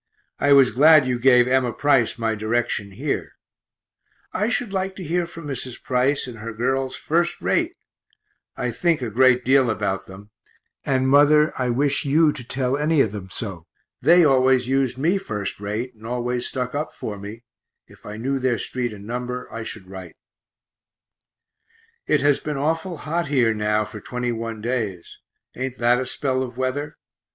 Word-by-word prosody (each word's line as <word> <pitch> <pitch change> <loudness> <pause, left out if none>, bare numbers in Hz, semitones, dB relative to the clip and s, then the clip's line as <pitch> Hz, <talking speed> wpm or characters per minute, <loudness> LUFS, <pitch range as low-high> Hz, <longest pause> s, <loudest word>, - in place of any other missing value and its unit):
I 145 - +2
was 135 -2 +6
glad 150 +4 +6
you 125 -1 -1
gave 125 -1 +5
Emma 130 -1 +2
Price 135 -3 +2
my 115 -1 0
direction 110 -1 -1
here; 95 - -4 1.0
I 210 +4 0
should 240 -4 -1
[like] 190 0 -2
to 185 - -7
hear 170 +1 -1
from 165 -2 -10
Mrs. 130 -3 -4
Price 130 +2 +1
and 120 -3 -9
her 115 +1 -6
girls 130 +4 -1
first 170 +2 0
rate, 350 +1 0 0.8
I - - -2
think 165 -6 0
a 115 - -3
great 125 +2 +4
deal 130 -1 +4
about 100 -3 -2
them 100 +2 -13 0.5
and 130 -1 +1
mother, 150 +3 +5
I 125 -1 -1
wish 140 +5 +1
you 150 +2 +3
to 125 - -7
tell 130 +1 -1
any 155 +1 +1
of 110 - +1
them 100 -3 -7
so; 95 -6 -5 0.3
they 170 +5 +6
always 130 -2 +3
used 135 -1 0
me 170 +8 +1
first 105 - -4
rate, 105 +5 -4
and 110 0 -12
always 125 0 -2
stuck 125 -2 -3
up 150 +2 -3
for 105 -2 -6
me 105 +4 -9 0.4
if - - -20
I 105 +1 -8
knew 135 +4 -2
their 130 -2 +1
street 120 +1 -3
and 100 -1 -11
number 125 +2 -4
I 115 - -5
should 105 -3 -7
write. 95 -3 -10 1.9
It 150 - +2
has 145 0 +3
been 150 -2 -4
awful 165 +4 -1
hot 165 +3 -2
here 125 -6 +2
now 105 0 0
for 105 0 -10
twenty 125 +2 -3
one 115 -1 -5
days; 110 -7 -4 0.4
ain't 130 0 -4
that 120 +1 +3
a 130 - -3
spell 130 0 -1
of 125 -2 -5
weather? 130 +3 -3
130 Hz, 175 wpm, -22 LUFS, 115-145 Hz, 1.9 s, was